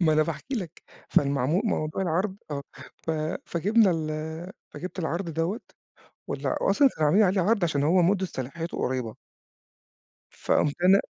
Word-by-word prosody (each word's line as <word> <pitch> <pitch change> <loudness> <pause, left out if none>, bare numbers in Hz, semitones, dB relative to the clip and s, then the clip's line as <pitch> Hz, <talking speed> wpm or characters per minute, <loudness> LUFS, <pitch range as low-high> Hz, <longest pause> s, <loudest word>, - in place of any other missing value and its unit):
ما 160 -3 +4
أنا 155 - +4
باحكي 160 - -4
لك، 185 - -5 0.3
فالمعم 140 -2 +2
موضوع 155 -4 -1
العَرْض 185 +3 0
آه. 140 -1 -3 0.3
ف - - -5 0.4
فجِبنا 200 +4 +3
ال 160 +2 -3 0.2
فجِبت 185 +2 -7
العرض 170 +1 -2
دوّة 165 +8 -1 0.7
ولا - - -2
وأصلًا 290 - +5
كان 155 - +1
عاملين 195 +9 +5
عليه 190 0 +2
عَرْض 200 +1 +2
عشان 150 -4 0
هو 175 +5 +4
مُدّة 190 +2 +2
صلاحيته 165 +3 -5
قريّبة. 125 -3 -2 1.2
فقُمت 145 - +1
أنا 195 +2 +6
170 Hz, 145 wpm, -26 LUFS, 155-190 Hz, 1.2 s, أنا